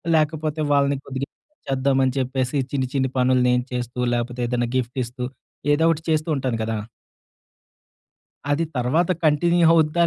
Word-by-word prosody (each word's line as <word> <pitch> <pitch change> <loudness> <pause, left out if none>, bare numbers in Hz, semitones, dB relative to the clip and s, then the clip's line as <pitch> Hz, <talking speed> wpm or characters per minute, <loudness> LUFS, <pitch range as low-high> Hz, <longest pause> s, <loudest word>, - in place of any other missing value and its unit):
లేకపోతే 155 0 0
వాళ్ళని 140 0 +3
కొద్దిగా 135 +1 -4 0.4
చేద్దామని 135 -1 +2
చెప్పేసి 130 +1 -1
చిన్ని, 130 -2 0
చిన్ని 135 -1 +1
పనులు 125 0 +3
నేను 125 0 +2
చేస్తూ 125 0 -4 0.2
లేపోతే, 120 +1 -3
ఏదైనా 120 -1 -1
గిఫ్ట్ 125 +1 -2
ఇస్తూ 125 +2 -7 0.5
ఏదోకటి 160 +1 +2
చేస్తూ 155 +1 0
ఉంటాను 130 -4 -1
కదా! 110 0 -2 1.7
అది 160 +3 +1
తర్వాత 145 +9 +1 0.2
కంటిన్యూ 170 +3 +3
అవుద్దా, 165 +1 +3
135 Hz, 130 wpm, -23 LUFS, 125-155 Hz, 1.7 s, వాళ్ళని